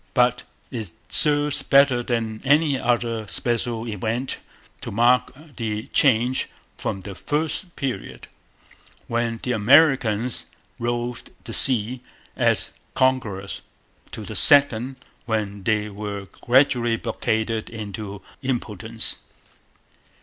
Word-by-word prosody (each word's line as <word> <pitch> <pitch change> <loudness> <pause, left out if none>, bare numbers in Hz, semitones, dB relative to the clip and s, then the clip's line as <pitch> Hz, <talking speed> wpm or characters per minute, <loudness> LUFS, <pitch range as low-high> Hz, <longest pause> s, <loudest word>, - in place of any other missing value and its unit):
But 125 -1 +2 0.3
it 110 -9 -6 0.2
serves 145 -1 +4
better 135 -3 +4
than 115 -3 -3
any 145 0 +2
other 115 -3 -1
special 120 +1 -2
event 115 +5 -3 0.4
to - - -6
mark 120 +4 +2 0.3
the 110 -2 -4
change 125 -1 +2 0.3
from 95 - -4
the 100 +1 -8
first 155 - -3
period, 135 -3 -5 0.8
when 115 -1 -2
the 125 - -2
Americans 125 -1 +3 0.3
roved 120 0 -3
the 115 - -8
sea 125 -2 +5 0.3
as - - +1 0.2
conquerors, 125 -7 -1 0.5
to - - -7
the - - -7
second, 135 -3 +6 0.3
when 105 -3 -2
they 105 +1 0
were 100 -1 -6 0.2
gradually 120 -2 +3
blockaded 110 -1 -2
into 105 -2 -7
utter 100 - -14 0.2
impotence. 115 -3 0
120 Hz, 105 wpm, -22 LUFS, 110-130 Hz, 0.8 s, second